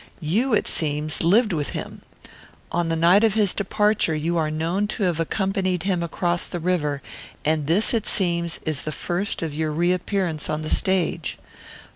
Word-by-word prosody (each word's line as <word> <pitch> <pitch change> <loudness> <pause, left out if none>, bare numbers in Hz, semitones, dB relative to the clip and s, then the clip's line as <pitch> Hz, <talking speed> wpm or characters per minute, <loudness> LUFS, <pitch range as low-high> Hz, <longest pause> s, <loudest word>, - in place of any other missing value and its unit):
You, 215 - +1
it - - 0
seems, 150 -1 +3
lived 210 +5 +3
with 150 -3 -2
him. - - -7 0.7
On 170 -1 0
the 165 - 0
night 175 +6 +4
of 220 -2 +3
his 210 -4 +2
departure 210 -4 +1
you 165 +3 -1
are 160 -2 +1
known 165 +6 -1
to 210 0 -3
have 175 -3 0
accompanied 185 0 -1
him 190 -3 0
across 175 +1 -1
the 175 - -5
river, 150 -5 -1 0.4
and 155 -1 0
this, 190 +10 +2
it 225 -2 -1
seems, 170 -3 0
is 155 -3 -2
the 155 - -4
first 175 +4 -3
of 160 -3 -3
your 155 +1 -2
reappearance 175 0 -1
on 155 0 -2
the 155 - -3
stage. 190 -4 +1
175 Hz, 175 wpm, -23 LUFS, 155-195 Hz, 0.7 s, night